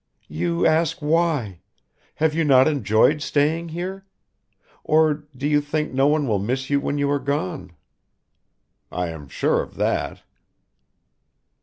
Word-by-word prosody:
"You 85 +2 -1
ask 160 0 +2
why. 150 - 0 0.6
Have 160 0 +1
you 165 +1 +1
not 135 -3 +5
enjoyed 145 0 +2
staying 155 +4 0
here? 185 +4 -5 0.8
Or 155 -1 +2
do 140 +3 -2
you 150 0 +3
think 150 0 -3
no 135 +2 +3
one 150 -1 +1
will 105 -4 +1
miss 130 +7 -3
you 140 - +3
when 145 +1 -2
you 145 0 +1
are 145 - +1
gone?" 110 -10 -3 1.2
"I 90 -1 -2
am 80 -3 -9
sure - - 0
of - - -10
that." - - -2
145 Hz, 140 wpm, -22 LUFS, 120-155 Hz, 1.2 s, not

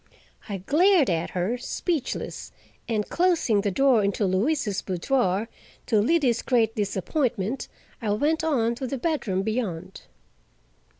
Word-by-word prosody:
I 200 - -2
glared 305 - +3
at 165 0 -1
her, 205 +8 -1
speechless, 310 +2 -3 0.4
and 215 -2 0
closing 335 - +2
the 205 - 0
door 250 +1 +3
into 200 +1 0
Louise's 205 +3 0
boudoir, 190 +2 0 0.4
to 215 -4 +3
Liddy's 255 -2 +2
great 230 -4 +2
disappointment, 215 - -1 0.3
I 220 - -2
went 305 +9 +1
on 240 -8 +1
to 260 - -4
the 270 - -3
bedroom 235 - -1
beyond. 190 -5 -3
230 Hz, 125 wpm, -25 LUFS, 200-275 Hz, 0.4 s, glared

